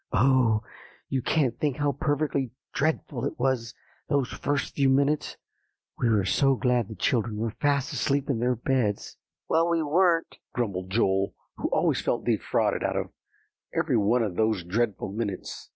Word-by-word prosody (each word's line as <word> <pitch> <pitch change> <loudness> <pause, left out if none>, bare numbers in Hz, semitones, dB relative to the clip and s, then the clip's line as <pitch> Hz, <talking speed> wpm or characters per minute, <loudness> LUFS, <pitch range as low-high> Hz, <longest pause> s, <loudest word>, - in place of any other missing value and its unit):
Oh! 115 -2 +3 0.5
you 130 - 0
can't 135 -3 +1
think 145 -4 0
how 145 -1 +1
perfectly 145 -1 -1 0.2
dreadful 145 -4 -1
it 140 - -3
was 125 -3 -1 0.3
those 140 -4 +1
first 145 0 -2
few 135 -2 +2
minutes; 140 +3 +1 0.6
we 120 - +2
were 105 -4 +2
so 135 +5 +3
glad 120 -1 +1
the 110 - -8
children 110 +2 0
were 115 +1 -1
fast 140 -2 +1
asleep 140 0 0
in 130 -5 0
their 125 +1 +1
beds." 120 -4 -1 0.3
"Well, 165 +1 +3
we 165 -1 +1
weren't," 165 +2 +2 0.2
grumbled 95 -6 -2
Joel, 95 -2 +1 0.2
who - - -2
always - - +1
felt - - -1
defrauded - - +1
out - - 0
of - - -3 0.6
every - - +1
one 115 +3 +3
of 100 -5 -3
those 110 -3 +1
dreadful 105 +2 -1
minutes. 100 -3 -5
125 Hz, 160 wpm, -27 LUFS, 110-140 Hz, 0.6 s, Oh